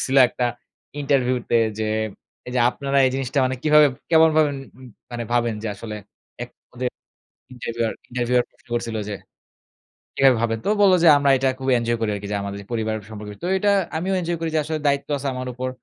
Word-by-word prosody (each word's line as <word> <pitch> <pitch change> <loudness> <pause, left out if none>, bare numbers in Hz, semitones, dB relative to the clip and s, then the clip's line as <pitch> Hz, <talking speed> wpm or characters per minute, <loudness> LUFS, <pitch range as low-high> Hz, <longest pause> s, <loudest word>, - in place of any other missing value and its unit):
করছিলো 135 +1 +2
একটা 125 0 -1 0.5
ইন্টারভিউতে 125 -4 +1 0.2
যে, 110 -1 -1 0.6
"এইযে 125 0 0
আপনারা 140 +1 -1
এই - - +2
জিনিসটা 135 +1 -2
মানে 130 0 0
কিভাবে, 150 -1 +6 0.2
কেমন 160 0 +6
ভাবেন 145 -3 +3 0.5
মানে 120 -1 -4
ভাবেন 120 -2 +1
যে 110 - -2
আসলে?" 105 +1 -7 0.5
এক - - -7 0.2
ওদের 125 0 -1 0.6
ইন্টারভিউয়ার, 115 -2 -3 0.2
ইন্টারভিউয়ার 125 0 +1
প্রশ্ন - - -31
করছিল 115 -1 -2
যে, 105 - -3 1.0
"কিভাবে 135 -3 +5
ভাবেন?" 115 -1 0
তো - - -1
ও - - -4
বলে 190 -2 +6
যে, 170 - +7
"আমরা 140 -1 +2
এটা 135 +1 +1
খুব 135 0 -5
এঞ্জয় 115 0 -1
করি 110 -2 0
আরকি 100 0 -6
যে, - - 0
আমাদের 100 0 -5
যে - - -17
পরিবার 110 -1 -1
সম্পর্কে।" 105 -1 -8
তো - - -1
এটা 205 +1 +3 0.3
আমিও 190 +3 -1
এঞ্জয় 170 0 -2
করি 165 -1 -2
যে, - - +3
আসলে 155 +1 -2
দায়িত্ব 140 0 +1
আছে 140 - -3
আমার 130 0 -5
উপর। 130 +1 -3
125 Hz, 195 wpm, -22 LUFS, 115-140 Hz, 1.0 s, যে